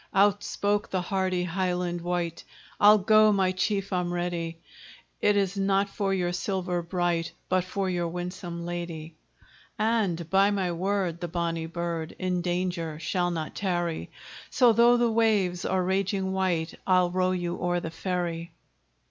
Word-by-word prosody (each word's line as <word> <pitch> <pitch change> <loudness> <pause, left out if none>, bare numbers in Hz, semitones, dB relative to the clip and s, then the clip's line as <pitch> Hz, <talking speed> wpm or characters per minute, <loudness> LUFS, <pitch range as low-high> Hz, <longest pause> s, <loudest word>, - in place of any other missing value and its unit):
Out 205 +1 +4
spoke 205 0 -1
the 185 - 0
hardy 185 -1 0
Highland 180 -1 -1
wight, 175 -1 -2 0.4
"I'll 210 +1 +8
go, 215 +2 +5
my 190 -2 +2
chief 195 +1 -1
I'm 180 -1 0
ready; 175 -2 -3 0.6
It 205 0 +3
is 195 -1 +1
not 195 0 +1
for 200 -1 -1
your 180 -2 0
silver 180 0 -2
bright, 170 -1 -1 0.2
But 185 -1 +2
for 195 +1 -2
your 175 -2 -1
winsome 175 0 -5
lady; 170 -2 -5 0.6
"And 210 -7 0
by 195 +1 +5
my 195 -3 0
word! 180 -1 -1
the 175 - -2
bonny 165 -1 -2
bird 170 -1 -4
In 180 -1 -1
danger 175 -3 -2
shall 175 +2 -1
not 160 -3 -4
tarry; 175 -4 -2 0.4
So 245 -3 +5
though 235 +2 +5
the 240 -1 +2
waves 205 -6 +2
are 190 -1 +1
raging 190 +1 0
white 180 -4 0
I'll 180 -2 +4
row 185 0 +1
you 175 -1 -2
o'er 175 0 +1
the 165 -1 -5
ferry." 170 -2 -3
180 Hz, 155 wpm, -27 LUFS, 175-195 Hz, 0.6 s, I'll